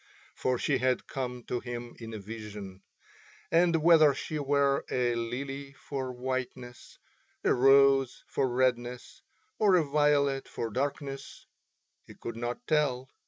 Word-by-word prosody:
For 130 Hz, -1 st, 0 dB
she -, -, 0 dB
had 130 Hz, 0 st, +1 dB
come 125 Hz, -2 st, -5 dB
to 120 Hz, -, -3 dB
him 120 Hz, -1 st, -7 dB
in 115 Hz, -1 st, -8 dB
a 110 Hz, -, -5 dB
vision; 105 Hz, -2 st, -8 dB, 0.7 s
and 165 Hz, -2 st, +3 dB
whether 155 Hz, -4 st, +6 dB
she 155 Hz, +2 st, -4 dB
were 140 Hz, -1 st, +2 dB
a 125 Hz, -1 st, +1 dB
lily 135 Hz, +4 st, -4 dB
for 135 Hz, -2 st, -5 dB
whiteness, 125 Hz, -1 st, -5 dB, 0.5 s
a -, -, +4 dB
rose 135 Hz, 0 st, +4 dB
for 130 Hz, -, 0 dB
redness, 125 Hz, -1 st, -1 dB, 0.4 s
or 205 Hz, -3 st, +5 dB
a 175 Hz, -, +4 dB
violet 140 Hz, -1 st, +2 dB
for 115 Hz, -1 st, -4 dB
darkness 135 Hz, +2 st, -4 dB, 0.6 s
he -, -, -12 dB
could 115 Hz, -, -7 dB
not 120 Hz, -, -4 dB
tell. 135 Hz, -, 0 dB
130 Hz, 135 wpm, -29 LUFS, 120-140 Hz, 0.7 s, whether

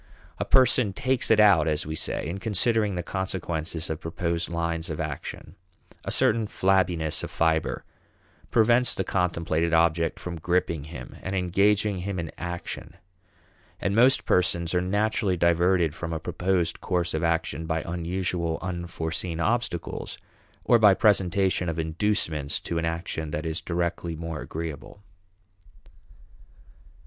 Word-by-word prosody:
A -, -, -1 dB
person 125 Hz, -5 st, +4 dB
"takes 130 Hz, +1 st, 0 dB
it 110 Hz, -, +5 dB
out" 100 Hz, -7 st, +6 dB
as 75 Hz, -1 st, 0 dB
we 80 Hz, -, -4 dB
say 80 Hz, -, -2 dB
in 90 Hz, +4 st, -4 dB
considering 105 Hz, 0 st, +1 dB
the 90 Hz, -, -3 dB
consequences 85 Hz, -3 st, -3 dB
of 80 Hz, -1 st, -4 dB
proposed 85 Hz, +1 st, -2 dB
lines 85 Hz, 0 st, -2 dB
of 80 Hz, -, -4 dB
action. 75 Hz, 0 st, -5 dB, 0.5 s
A -, -, -3 dB
certain 110 Hz, -1 st, +2 dB
flabbiness 90 Hz, -6 st, +1 dB
of -, -, -4 dB
fiber 80 Hz, -1 st, 0 dB, 0.6 s
prevents 120 Hz, +2 st, +4 dB
the 95 Hz, -, -1 dB
contemplated 85 Hz, -3 st, 0 dB
object 80 Hz, 0 st, +2 dB
from 85 Hz, -2 st, -6 dB
gripping 85 Hz, -3 st, 0 dB
him 80 Hz, +2 st, -9 dB
and 95 Hz, +1 st, -4 dB
engaging 100 Hz, +2 st, +2 dB
him 95 Hz, +1 st, -3 dB
in 85 Hz, -2 st, -4 dB
action. 85 Hz, -1 st, -6 dB, 0.8 s
And 100 Hz, -, -1 dB
most 125 Hz, +4 st, +5 dB
persons 85 Hz, -1 st, +1 dB
are 90 Hz, -, +2 dB
naturally 100 Hz, 0 st, 0 dB
diverted 85 Hz, -1 st, +3 dB
from 85 Hz, -1 st, -5 dB
a 80 Hz, -, -2 dB
proposed 90 Hz, +1 st, -1 dB
course 90 Hz, -2 st, -1 dB
of 80 Hz, +2 st, -1 dB
action 80 Hz, -1 st, -1 dB
by 80 Hz, -1 st, -1 dB
unusual, 85 Hz, -1 st, -2 dB
unforeseen 85 Hz, -2 st, -4 dB
obstacles, 110 Hz, -3 st, -2 dB, 0.5 s
or 120 Hz, -, +5 dB
by 105 Hz, -3 st, +7 dB
presentation 95 Hz, -3 st, +2 dB
of 80 Hz, -, -3 dB
inducements 80 Hz, -3 st, -1 dB
to 85 Hz, -, -2 dB
an 80 Hz, -, -1 dB
action 80 Hz, -1 st, -3 dB
that 75 Hz, +2 st, -4 dB
is 80 Hz, +1 st, -2 dB
directly 85 Hz, -1 st, -2 dB
more 80 Hz, -1 st, -5 dB
agreeable. 80 Hz, +4 st, -7 dB
85 Hz, 140 wpm, -26 LUFS, 80-95 Hz, 0.8 s, by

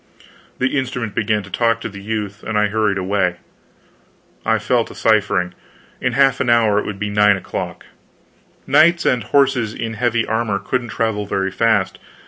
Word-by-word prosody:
The 130 Hz, +2 st, +1 dB
instrument 125 Hz, -5 st, -4 dB
began 105 Hz, -1 st, 0 dB
to 95 Hz, -, -13 dB
talk 115 Hz, +2 st, +1 dB
to -, -, -3 dB
the 100 Hz, 0 st, -10 dB
youth 105 Hz, 0 st, -4 dB
and 110 Hz, -1 st, -3 dB
I 105 Hz, 0 st, +2 dB
hurried 105 Hz, -2 st, +1 dB
away. 95 Hz, -2 st, 0 dB, 1.1 s
I -, -, +2 dB
fell -, -, +1 dB
to -, -, -12 dB
ciphering. 100 Hz, -5 st, +1 dB, 0.5 s
In -, -, 0 dB
half 135 Hz, -1 st, +3 dB
an 120 Hz, -, 0 dB
hour 110 Hz, -3 st, +4 dB
it -, -, -4 dB
would 105 Hz, -, -5 dB
be 105 Hz, +1 st, -3 dB
nine 105 Hz, -1 st, +4 dB
o'clock. 95 Hz, -, -6 dB, 0.8 s
Knights 160 Hz, +5 st, +4 dB
and 125 Hz, -3 st, +2 dB
horses 130 Hz, -4 st, +2 dB
in 115 Hz, -1 st, -4 dB
heavy 120 Hz, 0 st, 0 dB
armor 110 Hz, -2 st, -1 dB
couldn't 125 Hz, +3 st, -3 dB
travel 105 Hz, -2 st, -1 dB
very 95 Hz, -1 st, -1 dB
fast. 105 Hz, -2 st, +1 dB
110 Hz, 170 wpm, -19 LUFS, 100-120 Hz, 1.1 s, hour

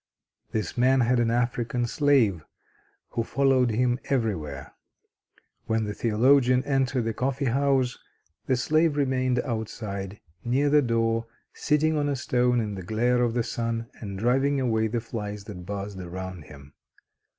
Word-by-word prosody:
This 110 Hz, +3 st, -3 dB
man 130 Hz, +1 st, +4 dB
had 120 Hz, +1 st, +2 dB
an 115 Hz, -1 st, +2 dB
African 120 Hz, 0 st, 0 dB
slave 120 Hz, -, +2 dB, 0.7 s
who 115 Hz, -, -2 dB
followed 130 Hz, 0 st, +2 dB
him 120 Hz, +2 st, +1 dB
everywhere. 90 Hz, -, -2 dB, 0.9 s
When 110 Hz, 0 st, +1 dB
the 105 Hz, -1 st, -3 dB
theologian 125 Hz, +4 st, +3 dB
entered 135 Hz, -3 st, 0 dB
the 115 Hz, 0 st, -2 dB
coffee 135 Hz, +4 st, -1 dB
house, 130 Hz, 0 st, +1 dB, 0.5 s
the 130 Hz, -, +3 dB
slave 155 Hz, +4 st, +2 dB
remained 130 Hz, -3 st, +1 dB
outside, 105 Hz, -4 st, -5 dB, 0.2 s
near 135 Hz, +4 st, +1 dB
the 150 Hz, 0 st, +6 dB
door, 115 Hz, -2 st, 0 dB, 0.3 s
sitting 155 Hz, +1 st, +1 dB
on 145 Hz, -1 st, 0 dB
a 140 Hz, -, 0 dB
stone 125 Hz, -1 st, +1 dB
in 105 Hz, -2 st, -2 dB
the 95 Hz, -, -6 dB
glare 120 Hz, +6 st, +1 dB
of 120 Hz, -1 st, +1 dB
the 120 Hz, -, +1 dB
sun, 115 Hz, 0 st, -3 dB
and 100 Hz, -3 st, -6 dB
driving 135 Hz, +6 st, +2 dB
away 110 Hz, -4 st, +1 dB
the 115 Hz, +1 st, -2 dB
flies 105 Hz, -3 st, -6 dB
that 90 Hz, -4 st, -9 dB
buzzed 100 Hz, -1 st, -5 dB
around 90 Hz, -2 st, -7 dB
him. 70 Hz, -1 st, -14 dB
120 Hz, 150 wpm, -26 LUFS, 110-130 Hz, 0.9 s, the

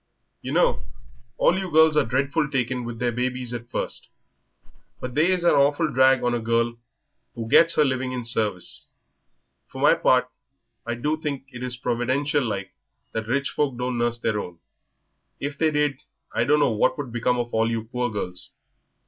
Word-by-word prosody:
"Yer -, -, -5 dB
know, -, -, +2 dB, 0.5 s
all 185 Hz, -, +3 dB
you 190 Hz, -1 st, -4 dB
girls 160 Hz, -1 st, +5 dB
are 150 Hz, -, +4 dB
dreadful 140 Hz, +5 st, 0 dB
taken 125 Hz, -2 st, -1 dB
with 120 Hz, -1 st, -6 dB
their 120 Hz, +1 st, 0 dB
babies 125 Hz, 0 st, -3 dB
at 120 Hz, 0 st, -6 dB
first. -, -, -4 dB, 0.9 s
But 125 Hz, -1 st, -6 dB
they 155 Hz, +6 st, +3 dB
is 185 Hz, -2 st, +1 dB
a 175 Hz, -, +5 dB
awful 145 Hz, +2 st, +2 dB
drag 130 Hz, 0 st, +4 dB
on 120 Hz, 0 st, +1 dB
a 120 Hz, -, 0 dB
girl 115 Hz, +1 st, 0 dB, 0.6 s
who 115 Hz, -1 st, -5 dB
gets 165 Hz, +8 st, +5 dB
her 150 Hz, -, +4 dB
living 130 Hz, -1 st, -1 dB
in 125 Hz, -2 st, -4 dB
service. 105 Hz, -6 st, -2 dB, 0.8 s
For -, -, -10 dB
my -, -, +6 dB
part 125 Hz, 0 st, +3 dB, 0.6 s
I 120 Hz, -, -1 dB
do 150 Hz, +6 st, -1 dB
think 140 Hz, -3 st, -4 dB
it 125 Hz, -2 st, -10 dB, 0.2 s
providential 140 Hz, +4 st, 0 dB
like 100 Hz, -5 st, -4 dB, 0.4 s
that 110 Hz, -1 st, -4 dB
rich 140 Hz, +4 st, 0 dB
folk 140 Hz, -4 st, -1 dB
don't 125 Hz, -1 st, -2 dB
nurse 120 Hz, 0 st, +1 dB
their 110 Hz, -2 st, -1 dB
own. 90 Hz, -3 st, -7 dB, 0.8 s
If 140 Hz, 0 st, -5 dB
they 160 Hz, -, +3 dB
did, 150 Hz, -3 st, 0 dB, 0.3 s
I -, -, +1 dB
dunno 145 Hz, -3 st, +3 dB
what 105 Hz, -, +1 dB
would 140 Hz, -5 st, -5 dB
become 120 Hz, +1 st, 0 dB
of 120 Hz, -1 st, -3 dB
all 110 Hz, 0 st, +2 dB
you 115 Hz, -1 st, -2 dB
poor 125 Hz, +2 st, -2 dB
girls. 90 Hz, -4 st, -5 dB
125 Hz, 180 wpm, -24 LUFS, 115-145 Hz, 0.9 s, my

